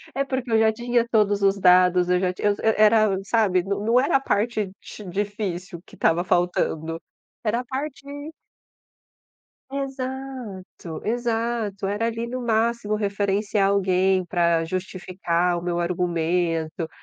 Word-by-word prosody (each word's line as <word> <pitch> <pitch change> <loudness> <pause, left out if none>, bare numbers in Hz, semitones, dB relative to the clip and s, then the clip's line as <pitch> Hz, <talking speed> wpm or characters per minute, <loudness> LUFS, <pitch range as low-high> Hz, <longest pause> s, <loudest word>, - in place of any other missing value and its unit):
É 275 - +1
porque 260 -3 -3
eu 225 - +4
já 220 0 +4
tinha 240 +1 0
todos 205 -3 +2
os 195 0 +2
dados, 180 -1 +5
eu 180 0 +3
já 185 -1 0
tinha 205 - 0
era 215 0 +4
era, 190 -2 0
sabe, 195 -4 +2
não 205 +5 +1
era 275 - +1
a - - -4
parte 215 -4 -1
ti 210 - -10
difícil 190 -2 -4
que - - -16
estava 170 +2 +2
faltando 165 -2 0 0.4
era 225 +1 0
a - - -13
parte 270 +1 -5 1.7
Exato, 260 - -6
exato, 230 -3 -1
era 205 +3 -1
ali, 230 0 -3
no 255 +2 -4
máximo 230 -2 0
referenciar 200 0 0
alguém 190 -1 +2
pra 170 -2 +1
justificar 180 -1 -1
o - - -4
meu 175 -1 -1
argumento, 170 -2 -1
200 Hz, 135 wpm, -24 LUFS, 180-230 Hz, 1.7 s, dados